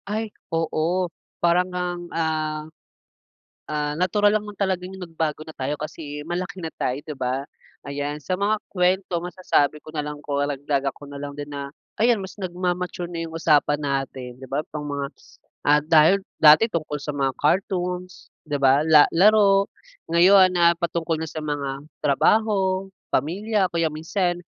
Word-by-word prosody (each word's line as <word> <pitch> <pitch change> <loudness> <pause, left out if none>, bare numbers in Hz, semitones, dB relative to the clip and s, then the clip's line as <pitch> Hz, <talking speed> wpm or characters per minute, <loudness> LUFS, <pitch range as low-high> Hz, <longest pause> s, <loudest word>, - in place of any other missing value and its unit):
Ay, 215 0 -3 0.2
oo 165 +2 0 0.3
parang 175 +2 +2
ngang, 180 -1 -3
ah, 155 -1 -1 1.0
ah, 150 -1 -2
natural 205 +3 +3
lang 210 0 0
naman 210 - -8
talaga 190 -2 0
yung 190 0 -9
nagbago 160 -3 -3
na 160 0 -10
tayo 135 +3 -1
kasi 150 -1 -6
malaki 180 +4 -4
na 160 - -4
tayo 130 +3 -1
di 150 - -7
ba? 130 +1 -1 0.4
Ayan, 145 +1 -4
sa 180 +6 -2
mga 210 +2 +1
kuwento 180 -1 +1
masasabi 170 -4 0
ko - - -10
nalang 150 -1 -5
karagdagan 140 -1 -1
ko - - -20
nalang 145 0 -6
di 145 - -5
na, 140 -1 -5 0.3
ayan 230 -2 +3
mas 190 +2 -9
nagmamature 180 -1 -3
na 165 -1 -4
yung 160 - -10
usapan 150 -2 +3
natin 135 -3 -3
di 130 - -10
ba, 140 +4 -1
pang 150 -1 -5
mga, 140 -1 -2 0.6
ah, 150 +1 +5
dahil 160 +5 +5 0.2
dati 155 +9 +7
tungkol 155 -4 -3
sa 150 - -3
mga 135 -2 -1
cartoons 180 +2 -1 0.2
di 150 - -3
ba, 140 +2 +4
la 155 -2 +8
laro 200 +1 +5 0.5
ngayon 185 +1 +6
na 170 -1 +4
patungkol 170 -1 -1
na 160 - -3
sa 155 - -5
mga 140 -2 -3 0.2
trabaho, 195 +4 +2 0.2
pamilya 195 - +1
o - - -9
kaya 165 -1 +1
minsan 175 +3 -1
165 Hz, 160 wpm, -23 LUFS, 145-185 Hz, 1.0 s, la